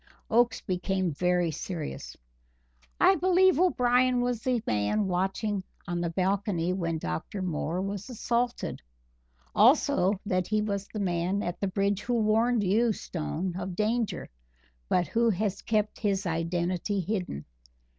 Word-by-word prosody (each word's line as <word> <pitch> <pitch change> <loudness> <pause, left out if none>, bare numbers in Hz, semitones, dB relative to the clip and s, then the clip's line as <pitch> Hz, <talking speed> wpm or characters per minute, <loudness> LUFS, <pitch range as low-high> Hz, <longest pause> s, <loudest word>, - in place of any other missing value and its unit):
Oakes 235 0 +3
became 185 0 -1
very 180 +2 +1
serious. 155 - -6 0.8
"I 385 - +6
believe 370 -1 +4
O'Brien 250 -7 +3
was 245 -2 -1
the 250 -1 +1
man 110 - +1
watching 190 +2 -1 0.2
on 175 -1 -2
the 170 - -1
balcony 185 0 0
when 170 -3 -1
Dr. 155 - -4
Moore 175 +1 -2
was 200 +3 -5
assaulted; 240 0 -2 0.7
also 190 +2 +4
that 185 -3 0
he 215 0 +1
was 200 -2 -2
the 215 - -6
man 185 +1 0
at 175 - -4
the 200 - 0
bridge 200 +1 0
who 245 0 -1
warned 225 +1 +2
you, 220 +5 +3
Stone, 175 0 -4
of 185 -1 -4
danger, 220 +2 -1 0.6
but 180 - +3
who 230 +4 +2
has 200 -1 -1
kept 215 -1 0
his 200 -2 0
identity 175 +3 -1
hidden. 180 - -3
195 Hz, 135 wpm, -28 LUFS, 180-225 Hz, 0.8 s, I